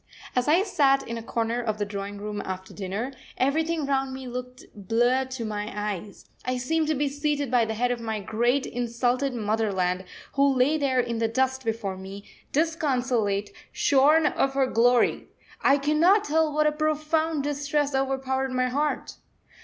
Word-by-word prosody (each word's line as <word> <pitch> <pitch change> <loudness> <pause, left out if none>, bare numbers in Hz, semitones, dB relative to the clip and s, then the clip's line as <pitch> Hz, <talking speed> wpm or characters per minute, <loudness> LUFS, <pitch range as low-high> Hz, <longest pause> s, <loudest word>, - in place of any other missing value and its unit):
As 250 +1 +1
I 335 +6 +4
sat 275 -9 +2
in 230 - -4
a - - -7
corner 230 +1 -1
of 215 -3 -2
the 205 - -1
drawing 200 0 -5
room 205 0 -4
after 190 0 -6
dinner, 205 +6 -4 0.3
everything 315 +4 +1
round 270 -1 0
me 265 -1 -7
looked 250 +1 -7
blurred 240 +6 +1
to 255 -3 -4
my 210 -1 -4
eyes. 205 -1 -5 0.2
I 255 0 -1
seemed 310 +5 0
to 310 - +1
be 290 +1 0
seated 290 -1 -1
by 245 -2 +4
the 220 0 -3
head 245 +2 +1
of 245 - -2
my 220 -2 -3
great, 240 +6 +1
insulted 245 +3 -1
Motherland, 200 -5 0 0.3
who 275 -1 +3
lay 275 +5 +3
there 265 -3 +1
in 235 -2 -1
the 225 - +2
dust 260 +3 0
before 220 -4 -2
me, 195 +2 -9 0.3
disconsolate, 255 -10 0 0.2
shorn 295 +3 +4
of 275 -2 +1
her 275 -1 +3
glory. 245 0 +2 0.3
I 275 - +5
cannot 315 +8 +4
tell 320 -2 +1
what 305 +1 +2
a 300 - +4
profound 310 0 0
distress 290 0 -1
overpowered 265 0 0
my 255 0 +1
heart. 295 +4 -2
255 Hz, 170 wpm, -26 LUFS, 225-285 Hz, 0.3 s, I